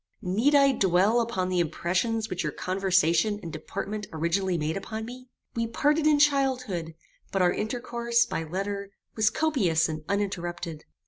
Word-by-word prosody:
"Need 220 Hz, +11 st, +2 dB
I 275 Hz, -1 st, +6 dB
dwell 200 Hz, +1 st, +3 dB
upon 190 Hz, -6 st, -1 dB
the 180 Hz, -1 st, +1 dB
impressions 185 Hz, +7 st, 0 dB
which 180 Hz, -3 st, -3 dB
your 150 Hz, -, -2 dB
conversation 185 Hz, +2 st, +1 dB
and 165 Hz, -, -6 dB
deportment 210 Hz, +6 st, -5 dB
originally 170 Hz, +3 st, 0 dB
made 155 Hz, 0 st, -1 dB
upon 220 Hz, +3 st, -5 dB
me? 250 Hz, +2 st, -10 dB, 0.3 s
We 230 Hz, 0 st, 0 dB
parted 295 Hz, +6 st, +2 dB
in 300 Hz, -1 st, +5 dB
childhood; 255 Hz, -, +1 dB, 0.4 s
but 195 Hz, -2 st, +2 dB
our 175 Hz, -, +3 dB
intercourse, 235 Hz, +1 st, 0 dB
by 165 Hz, -, -3 dB
letter, 200 Hz, +4 st, -4 dB, 0.3 s
was 215 Hz, -1 st, +3 dB
copious 205 Hz, -, +1 dB
and 155 Hz, -1 st, -5 dB
uninterrupted. 175 Hz, -5 st, -3 dB
200 Hz, 150 wpm, -27 LUFS, 175-235 Hz, 0.4 s, I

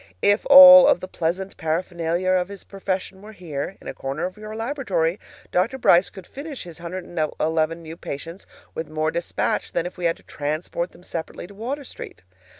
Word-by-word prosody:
If 205 Hz, +1 st, +3 dB
all 275 Hz, -1 st, +11 dB
of -, -, +4 dB
the 185 Hz, -, -7 dB
pleasant 185 Hz, +3 st, -3 dB
paraphernalia 170 Hz, +2 st, -1 dB
of 180 Hz, -1 st, +2 dB
his 200 Hz, -1 st, -9 dB
profession 190 Hz, -1 st, -4 dB
were 215 Hz, +1 st, -12 dB
here, 170 Hz, -2 st, -6 dB
in -, -, -13 dB
a -, -, -4 dB
corner 135 Hz, +5 st, -4 dB
of 185 Hz, -, -5 dB
your 215 Hz, 0 st, -8 dB
laboratory, 220 Hz, -, -1 dB, 0.3 s
Dr. 225 Hz, +9 st, +1 dB
Brice 180 Hz, -7 st, +4 dB
could 190 Hz, -3 st, -12 dB
finish 280 Hz, -, -8 dB
his 170 Hz, -2 st, -11 dB
111 165 Hz, -2 st, -2 dB
new 160 Hz, +1 st, -9 dB
patients 165 Hz, +6 st, -8 dB, 0.3 s
with 160 Hz, -, -5 dB
much 155 Hz, -, -13 dB
more 155 Hz, 0 st, 0 dB
despatch 170 Hz, -, -2 dB
than 165 Hz, -, 0 dB
if 180 Hz, -, -7 dB
we 175 Hz, -, -3 dB
had 165 Hz, -, +1 dB
to -, -, -22 dB
transport 155 Hz, +4 st, -4 dB
them -, -, -18 dB
separately 165 Hz, -1 st, -6 dB
to 195 Hz, -, -13 dB
Water 255 Hz, +8 st, -5 dB
Street. 250 Hz, -, -10 dB
180 Hz, 190 wpm, -23 LUFS, 165-200 Hz, 0.3 s, all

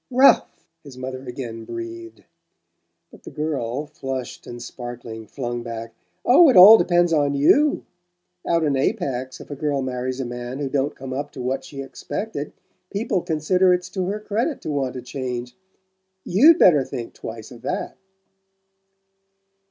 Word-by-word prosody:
"RALPH!" 260 Hz, +2 st, +5 dB, 0.4 s
his 140 Hz, -4 st, -12 dB
mother 130 Hz, 0 st, -6 dB
again 120 Hz, -3 st, -6 dB
breathed; 345 Hz, -, -8 dB, 0.9 s
but -, -, -16 dB
the -, -, -10 dB
girl, 145 Hz, -3 st, -3 dB
flushed 135 Hz, -4 st, -6 dB
and 120 Hz, -, -8 dB
sparkling, 120 Hz, -2 st, -8 dB
flung 120 Hz, -3 st, -4 dB
back: 115 Hz, -1 st, -7 dB, 0.3 s
"Oh, 295 Hz, +6 st, +7 dB
it 255 Hz, -, +4 dB
all 205 Hz, +5 st, +11 dB
depends 175 Hz, -1 st, +3 dB
on 145 Hz, -2 st, +2 dB
YOU! 280 Hz, -, +3 dB, 0.6 s
Out 170 Hz, -1 st, +2 dB
in 145 Hz, -3 st, +1 dB
Apex, 135 Hz, -, -2 dB
if -, -, -11 dB
a -, -, -4 dB
girl 140 Hz, -1 st, -1 dB
marries 130 Hz, 0 st, -3 dB
a 135 Hz, -, -2 dB
man 120 Hz, +1 st, -6 dB
who 140 Hz, -1 st, -3 dB
don't 140 Hz, +1 st, -1 dB
come 130 Hz, 0 st, -7 dB
up 145 Hz, +2 st, -4 dB
to 130 Hz, -, -7 dB
what 135 Hz, +2 st, -2 dB
she 135 Hz, -1 st, -7 dB
expected, 145 Hz, +3 st, -5 dB, 0.4 s
people 205 Hz, -2 st, -1 dB
consider 180 Hz, +3 st, +2 dB
it's 180 Hz, 0 st, -6 dB
to 185 Hz, -1 st, -3 dB
her 205 Hz, +2 st, -2 dB
credit 220 Hz, +7 st, -2 dB
to 155 Hz, -, -4 dB
want 135 Hz, -3 st, -2 dB
to 125 Hz, -, -6 dB
change. 125 Hz, -2 st, -5 dB, 0.7 s
YOU'D 295 Hz, -, +6 dB
better 150 Hz, -, +6 dB
think 120 Hz, -2 st, -7 dB
twice 110 Hz, 0 st, -8 dB
of 120 Hz, -2 st, -12 dB
that!" 130 Hz, -, -3 dB
140 Hz, 160 wpm, -22 LUFS, 125-180 Hz, 0.9 s, all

